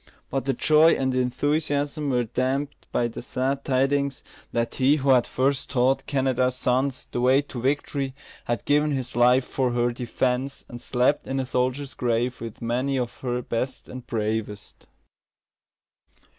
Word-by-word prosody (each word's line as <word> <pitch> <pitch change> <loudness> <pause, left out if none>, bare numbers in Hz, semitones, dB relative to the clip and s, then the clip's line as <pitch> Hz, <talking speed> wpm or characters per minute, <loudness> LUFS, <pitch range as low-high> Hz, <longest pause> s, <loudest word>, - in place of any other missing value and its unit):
But 135 -1 -1
the 135 - +1
joy 155 +5 +5
and 130 -1 0
enthusiasm 145 +3 0
were 125 -2 +2
damped 130 +5 -2
by 120 - +1
the 115 - -7
sad 135 +3 -2
tidings, 135 0 +1 0.3
that 115 0 -1
he 135 +2 +3
who 140 -2 +2
had 125 -2 +4
first 135 +1 0
taught 135 +1 +1
Canada's 130 -2 +1
sons 130 +1 0
the 120 - -2
way 130 +3 +4
to 130 -4 -7
victory 135 0 -1 0.3
had 120 0 -2
given 150 +1 +3
his 130 -2 -4
life 125 +2 +4
for 130 -3 -1
her 120 0 +1
defence, 125 +2 -2
and 120 0 -9
slept 125 +3 +1
in 135 0 -1
a 130 - -1
soldier's 130 +2 -1
grave 120 0 -1
with 115 0 -7
many 130 +4 0
of 125 -2 -3
her 125 -1 -2
best 125 +3 -3
and 130 -1 -9
bravest. 105 -2 -3
130 Hz, 155 wpm, -25 LUFS, 125-140 Hz, 0.3 s, joy